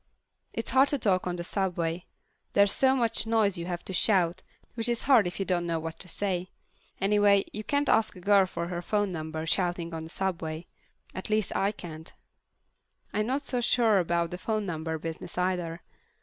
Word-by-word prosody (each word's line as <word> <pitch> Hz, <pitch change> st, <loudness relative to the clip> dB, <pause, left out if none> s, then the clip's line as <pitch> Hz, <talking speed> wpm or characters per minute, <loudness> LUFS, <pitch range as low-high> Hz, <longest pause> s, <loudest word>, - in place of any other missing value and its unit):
It's -, -, -3 dB
hard 265 Hz, +1 st, +5 dB
to 285 Hz, -, +1 dB
talk 185 Hz, -7 st, +1 dB
on 180 Hz, -, -1 dB
the 175 Hz, -, -4 dB
subway. 175 Hz, -2 st, -2 dB, 0.5 s
There's 200 Hz, 0 st, +5 dB
so 265 Hz, 0 st, +3 dB
much 230 Hz, -3 st, +1 dB
noise 220 Hz, -4 st, +2 dB
you 170 Hz, -, -5 dB
have 175 Hz, -1 st, -4 dB
to 190 Hz, -, -6 dB
shout, 185 Hz, -2 st, +2 dB, 0.3 s
which 230 Hz, 0 st, -2 dB
is 235 Hz, -1 st, 0 dB
hard 245 Hz, -9 st, +5 dB
if 175 Hz, -, -5 dB
you 195 Hz, -, 0 dB
don't 175 Hz, -2 st, 0 dB
know 165 Hz, -1 st, 0 dB
what 160 Hz, 0 st, -6 dB
to 180 Hz, -, -6 dB
say. 185 Hz, -1 st, -1 dB, 0.5 s
Anyway, 200 Hz, 0 st, +4 dB
you 215 Hz, -, -4 dB
can't 285 Hz, +4 st, 0 dB
ask 220 Hz, -1 st, +3 dB
a -, -, -10 dB
girl 195 Hz, +1 st, +4 dB
for 170 Hz, -1 st, -4 dB
her 175 Hz, -1 st, -3 dB
phone 205 Hz, +2 st, 0 dB
number 160 Hz, -1 st, -4 dB
shouting 175 Hz, -1 st, 0 dB
on 160 Hz, -, -4 dB
the 160 Hz, -, -9 dB
subway. 170 Hz, -3 st, -3 dB, 0.5 s
At 185 Hz, -, -6 dB
least 215 Hz, -1 st, 0 dB
I 200 Hz, +1 st, +2 dB
can't. 160 Hz, -6 st, -9 dB, 1.0 s
I'm 210 Hz, +1 st, 0 dB
not 270 Hz, +3 st, -1 dB
so 250 Hz, -3 st, -1 dB
sure 230 Hz, -4 st, +4 dB
about 170 Hz, -1 st, 0 dB
the 180 Hz, -, -5 dB
phone 215 Hz, +1 st, -1 dB
number 160 Hz, -2 st, -3 dB
business 165 Hz, +2 st, -6 dB
either. 180 Hz, -2 st, -1 dB
185 Hz, 195 wpm, -28 LUFS, 170-215 Hz, 1.0 s, hard